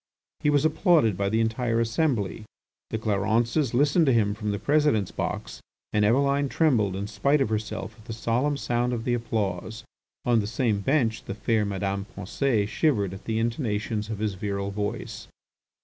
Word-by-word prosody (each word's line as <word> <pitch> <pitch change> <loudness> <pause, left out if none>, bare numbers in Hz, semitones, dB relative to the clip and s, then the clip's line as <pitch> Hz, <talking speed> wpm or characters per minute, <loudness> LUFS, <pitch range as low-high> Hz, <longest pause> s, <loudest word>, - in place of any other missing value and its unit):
He 150 - +1
was 145 0 +3
applauded 155 - +3
by 100 +1 0
the 110 +2 +1
entire 115 +1 0
assembly. 115 - 0 0.5
The - - -2
Clarences 110 +5 +1
listened 145 +4 +3
to - - +5
him 105 -3 +2
from 105 0 -4
the 100 - -1
President's 145 -7 +2
box - - -4 0.3
and 105 - +3
Eveline 140 +5 +2
trembled 115 - +2
in 100 +1 -3
spite 125 +8 +1
of 135 - +1
herself 110 -1 -3
at 110 - -17
the 115 - -5
solemn 120 +6 0
sound 120 -1 0
of 115 -2 -3
the 120 - 0
applause. 110 -2 -2 0.4
On 120 -2 +4
the 105 - -1
same 110 -2 0
bench 115 -1 0
the 100 - -5
fair 110 +1 +1
Madame 100 0 -2
Pensée 105 +2 0
shivered 105 - +1
at 95 - -10
the 110 -1 -1
intonations 110 -2 -1
of 110 - -3
his 105 -1 -1
virile 100 0 -3
voice. 105 +3 -4
110 Hz, 175 wpm, -26 LUFS, 105-130 Hz, 0.5 s, to